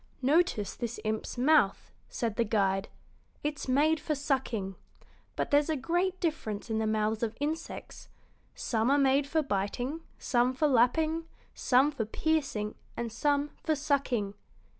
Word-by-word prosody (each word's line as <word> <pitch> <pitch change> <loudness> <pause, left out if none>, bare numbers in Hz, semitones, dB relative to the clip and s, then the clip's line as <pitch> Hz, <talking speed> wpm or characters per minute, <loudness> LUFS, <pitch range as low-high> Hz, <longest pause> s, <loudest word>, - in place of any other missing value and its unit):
"Notice 280 - +2
this 235 -1 -5
imp's 220 +2 -3
mouth," 255 -6 +3 0.2
said 230 -3 -2
the 235 - +2
guide. 195 -2 +1 0.5
"It's 295 -1 -3
made 300 +5 +3
for 305 - -1
sucking. 260 -9 -1 0.6
But - - -2
there's 290 +2 +4
a 315 - +2
great 350 +7 0
difference 230 - -2
in 220 - +1
the 220 - 0
mouths 215 0 0
of 230 -1 -2
insects: 310 +3 -5 0.5
some 225 +1 0
are 280 - +4
made 275 0 +3
for 315 +2 +1
biting, 245 +7 -2 0.2
some 245 0 +1
for 300 +4 +2
lapping, 315 +6 +2 0.3
some 265 +3 +3
for 240 -7 -2
piercing, 270 -5 -1 0.2
and 235 -1 -3
some 285 +5 +1
for 315 - +1
sucking. 270 -8 0
265 Hz, 145 wpm, -30 LUFS, 220-300 Hz, 0.6 s, there's